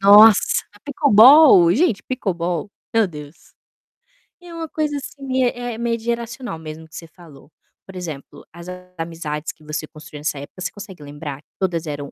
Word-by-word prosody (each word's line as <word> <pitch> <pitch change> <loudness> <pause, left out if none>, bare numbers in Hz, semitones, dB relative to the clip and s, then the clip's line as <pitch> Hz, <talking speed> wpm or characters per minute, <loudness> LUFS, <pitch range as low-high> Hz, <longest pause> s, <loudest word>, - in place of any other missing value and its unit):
Nossa! 205 +2 +7 0.2
Pickleball, 260 - +7
gente, 245 - +1
Pickleball! 180 - -3 0.2
Meu 225 -2 +4
Deus. 150 -2 -12 0.9
É 350 -1 -12
uma 325 -1 -5
coisa 300 -2 -2
assim, 280 0 -9
mei 260 -2 +1
eh, 245 -2 -5
meio 235 0 -1
de 225 - -14
geracional 235 -4 -4
mesmo 160 0 -9
que 155 - -16
você 165 - -8
falou. 160 -3 -17 0.3
Por 190 - -13
exemplo, 150 -5 -8
as 170 +1 -11 0.3
amizades 165 -2 -4
que 155 - -24
você 155 0 -5
construiu 150 -1 -12
nessa 150 -1 -2
época, 145 +6 -11
você 190 - -3
consegue 195 -6 -11
lembrar 145 -1 -8
que - - -53
todas 170 -4 -1
eram 145 -1 -5
180 Hz, 170 wpm, -20 LUFS, 155-235 Hz, 0.9 s, Nossa